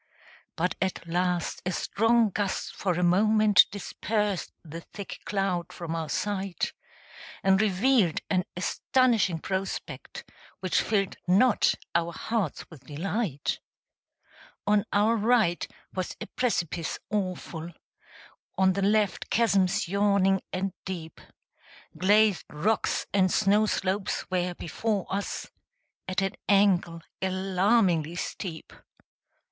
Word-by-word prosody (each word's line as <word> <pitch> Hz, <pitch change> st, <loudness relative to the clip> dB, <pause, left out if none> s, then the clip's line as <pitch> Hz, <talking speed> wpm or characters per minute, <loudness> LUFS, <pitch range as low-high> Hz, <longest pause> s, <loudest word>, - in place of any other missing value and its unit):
But 180 Hz, +3 st, 0 dB
at 190 Hz, -2 st, -2 dB
last 175 Hz, +1 st, -1 dB
a 180 Hz, -, -1 dB
strong 225 Hz, +3 st, +2 dB
gust 200 Hz, 0 st, -2 dB
for 185 Hz, -3 st, 0 dB
a 180 Hz, +1 st, -1 dB
moment 210 Hz, +3 st, +5 dB
Dispersed 205 Hz, -1 st, -2 dB
the 165 Hz, +1 st, -8 dB
thick 200 Hz, +3 st, -9 dB
cloud 195 Hz, -4 st, -1 dB
from 165 Hz, -2 st, -5 dB
our 160 Hz, -2 st, -3 dB
sight, 195 Hz, -3 st, -2 dB, 0.7 s
And 195 Hz, +1 st, +4 dB
revealed 215 Hz, -, +3 dB
an 185 Hz, -2 st, +1 dB
astonishing 225 Hz, -2 st, +2 dB
prospect, 190 Hz, +3 st, -5 dB, 0.3 s
Which 185 Hz, -2 st, +1 dB
filled 200 Hz, -3 st, 0 dB
not 205 Hz, +6 st, +4 dB, 0.2 s
our 170 Hz, 0 st, 0 dB
hearts 220 Hz, -8 st, -2 dB
with 145 Hz, -5 st, -13 dB
delight: 165 Hz, -, -2 dB, 1.1 s
On 210 Hz, 0 st, +3 dB
our 210 Hz, +3 st, +3 dB
right 220 Hz, -5 st, +2 dB, 0.3 s
was 185 Hz, -1 st, -3 dB
a -, -, -5 dB
precipice 175 Hz, -9 st, -1 dB
awful; 180 Hz, -5 st, -3 dB, 0.9 s
On 190 Hz, 0 st, +4 dB
the 195 Hz, -, -2 dB
left 205 Hz, -1 st, +1 dB
chasms 200 Hz, -7 st, +2 dB
yawning 200 Hz, 0 st, +2 dB
and 190 Hz, 0 st, -2 dB
deep; 170 Hz, -4 st, -7 dB, 0.7 s
Glazed 205 Hz, +3 st, +3 dB
rocks 205 Hz, +9 st, 0 dB
and 190 Hz, -2 st, +3 dB
snow 210 Hz, +1 st, +3 dB
slopes 195 Hz, +1 st, -1 dB
were 180 Hz, -1 st, 0 dB
before 205 Hz, +4 st, -2 dB
us, 200 Hz, +1 st, -3 dB, 0.6 s
At 185 Hz, +1 st, 0 dB
an 195 Hz, -, -1 dB, 0.2 s
angle 185 Hz, -5 st, +3 dB, 0.2 s
alarmingly 185 Hz, -3 st, +2 dB
steep. 175 Hz, -2 st, -5 dB
190 Hz, 110 wpm, -27 LUFS, 175-210 Hz, 1.1 s, moment